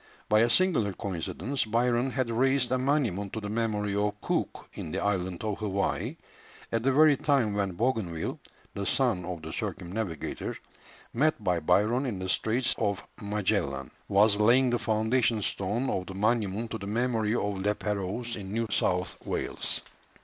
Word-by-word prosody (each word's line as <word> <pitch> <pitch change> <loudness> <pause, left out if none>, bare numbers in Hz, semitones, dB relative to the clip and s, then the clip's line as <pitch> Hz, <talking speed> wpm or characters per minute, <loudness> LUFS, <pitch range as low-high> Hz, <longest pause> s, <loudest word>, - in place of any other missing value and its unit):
By 105 - +4
a 115 +2 +4
singular 130 - +3
coincidence 100 - -3
Byron 120 +3 +1
had 130 -2 -1
raised 130 +1 +2
a 130 - +2
monument 125 -8 0
to 110 - -2
the 105 -1 -5
memory 105 -3 0
of 105 0 0
Cook - - -2
in 80 - -6
the 95 - -2
island 95 -3 -1
of 105 -2 -2
Hawaii, 100 -2 -1 0.5
at 115 - +1
the 135 +3 +2
very 150 +2 +6
time 135 -7 +2
when 100 -2 0
Bougainville, 105 -6 -1 0.3
the 100 -1 -3
son 120 -9 +1
of 85 -3 -5
the 80 - -6
circumnavigator, 90 -3 -4 0.6
met 150 -2 +1
by 90 -3 +2
Byron 105 - +2
in 110 -6 -2
the 95 0 -4
Straits 120 +6 +2
of 100 -3 -1 0.2
Magellan, 95 - -1 0.2
was 100 +1 +4
laying 125 +4 +5
the 120 - +1
foundation 110 0 +1
stone 105 +9 -1
of 90 -6 -2
the 95 - -7
monument 110 +1 0
to 110 - -3
the 100 - -6
memory 115 0 +1
of 100 -4 -1
La 105 +1 +2
Pérouse 105 +4 -3
in 95 -2 -7
New 115 +2 0
South 90 -1 0
Wales. - - -2
105 Hz, 165 wpm, -28 LUFS, 100-120 Hz, 0.6 s, very